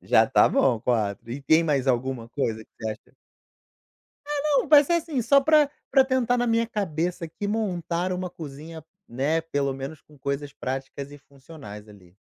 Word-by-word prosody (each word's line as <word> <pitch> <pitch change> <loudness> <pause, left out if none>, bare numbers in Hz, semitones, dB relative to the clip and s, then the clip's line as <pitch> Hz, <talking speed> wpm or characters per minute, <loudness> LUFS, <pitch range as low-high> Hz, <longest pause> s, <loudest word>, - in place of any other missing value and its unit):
Já - - +4
tá - - +4
bom, 120 -5 +2
4, 115 -2 -1
e 135 +4 -5
tem 160 +3 +4
mais 140 -4 0
alguma 125 -2 -1
coisa 110 -6 -2
que - - -44
você 110 -1 -3
acha 110 - -11 1.1
Ah 295 -1 -2 0.2
não, - - -6
vai 295 -2 +8
ser 345 - +1
assim, 315 -6 -1
só 275 +5 +5
pra 300 0 +4 0.2
pra 270 -2 +5
tentar 250 -2 +1
na 245 - +1
minha 230 0 +2
cabeça 180 -5 -2
aqui, 200 +5 -6
montar 185 -4 -1
uma 180 -1 -4
cozinha, 160 0 -9 0.2
né, 145 +7 0
pelo 140 -4 -1
menos 135 +3 -7
com 150 - -21
coisas 140 +1 -3
práticas 135 +2 -5
e 145 - -11
funcionais, 135 -7 -12
ali. 95 -4 -18
155 Hz, 180 wpm, -25 LUFS, 130-210 Hz, 1.1 s, vai